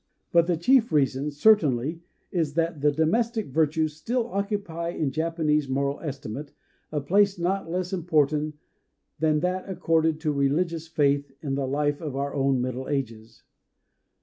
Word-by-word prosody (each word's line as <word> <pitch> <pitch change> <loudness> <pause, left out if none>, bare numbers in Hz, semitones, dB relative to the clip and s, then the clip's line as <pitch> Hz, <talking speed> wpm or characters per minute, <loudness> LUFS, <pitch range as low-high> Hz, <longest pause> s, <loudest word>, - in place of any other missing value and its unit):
But 170 0 +4
the 175 -2 +1
chief 235 +6 +3
reason 140 -1 +1
certainly 150 - +3 0.3
is 160 -5 -1
that 165 -3 0
the 150 0 +4
domestic 220 - 0
virtues 155 +1 +1
still 235 +9 -1
occupy 200 -5 -2
in 155 -5 -2
Japanese 155 -2 0
moral 140 +1 -1
estimate 140 -1 -6 0.4
a 150 - -1
place 195 +7 +3
not 180 +1 -1
less 180 +2 -2
important 155 -3 +1 0.6
than 155 -1 +2
that 185 +2 -2
accorded 165 -3 +1
to 155 -2 0
religious 160 +4 0
faith 145 -2 +1
in 140 -3 -2
the 135 -1 -1
life 145 +2 0
of 150 -5 -4
our 140 +1 -2
own 135 -1 +1
Middle 130 +1 -3
Ages. 115 -5 -4
155 Hz, 150 wpm, -26 LUFS, 140-170 Hz, 0.6 s, But